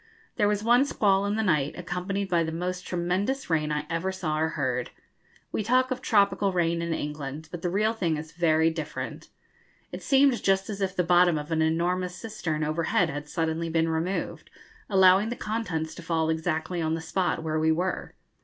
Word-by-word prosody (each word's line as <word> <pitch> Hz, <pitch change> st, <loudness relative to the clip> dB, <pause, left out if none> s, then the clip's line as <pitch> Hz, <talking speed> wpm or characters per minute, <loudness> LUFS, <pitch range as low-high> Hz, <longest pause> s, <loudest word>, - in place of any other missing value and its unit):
There 205 Hz, -, +2 dB
was 210 Hz, 0 st, 0 dB
one 240 Hz, +3 st, +5 dB
squall 200 Hz, -7 st, +2 dB
in 205 Hz, -, 0 dB
the 220 Hz, -, 0 dB
night, 150 Hz, -8 st, +1 dB
accompanied 180 Hz, +3 st, -3 dB
by 170 Hz, -3 st, +2 dB
the 160 Hz, -, -3 dB
most 180 Hz, +2 st, -4 dB
tremendous 185 Hz, +8 st, -1 dB
rain 155 Hz, -1 st, +1 dB
I 150 Hz, 0 st, -1 dB
ever 170 Hz, +3 st, -1 dB
saw 160 Hz, -5 st, -2 dB
or 160 Hz, +1 st, +1 dB
heard. 125 Hz, -3 st, -1 dB, 0.6 s
We -, -, -1 dB
talk 255 Hz, +4 st, +2 dB
of 255 Hz, 0 st, -2 dB
tropical 200 Hz, -3 st, +2 dB
rain 170 Hz, -2 st, +1 dB
in 170 Hz, 0 st, -2 dB
England, 150 Hz, 0 st, -4 dB
but 175 Hz, -, -6 dB
the 175 Hz, -, -1 dB
real 210 Hz, +5 st, +1 dB
thing 170 Hz, -8 st, -1 dB
is 155 Hz, +1 st, -7 dB
very 165 Hz, -1 st, +2 dB
different. 155 Hz, -2 st, -6 dB, 0.6 s
It -, -, -7 dB
seemed 270 Hz, -2 st, +3 dB
just 195 Hz, +2 st, +1 dB
as 200 Hz, -1 st, -6 dB
if 190 Hz, -1 st, -1 dB
the 180 Hz, -, +2 dB
bottom 175 Hz, -1 st, +4 dB
of 150 Hz, +2 st, -6 dB
an 160 Hz, 0 st, +1 dB
enormous 175 Hz, +3 st, 0 dB
cistern 175 Hz, -7 st, -3 dB
overhead 165 Hz, +2 st, +1 dB
had 145 Hz, +1 st, -6 dB
suddenly 165 Hz, 0 st, -1 dB
been 165 Hz, 0 st, +1 dB
removed, 165 Hz, +4 st, -3 dB, 0.4 s
allowing 190 Hz, +1 st, +5 dB
the 240 Hz, -, -3 dB
contents 180 Hz, -10 st, -3 dB
to -, -, -9 dB
fall 160 Hz, -1 st, 0 dB
exactly 160 Hz, +1 st, -2 dB
on 160 Hz, 0 st, 0 dB
the -, -, -4 dB
spot 170 Hz, 0 st, -1 dB
where 155 Hz, 0 st, -1 dB
we 160 Hz, 0 st, +3 dB
were. 180 Hz, +3 st, -2 dB
175 Hz, 195 wpm, -27 LUFS, 160-195 Hz, 0.6 s, one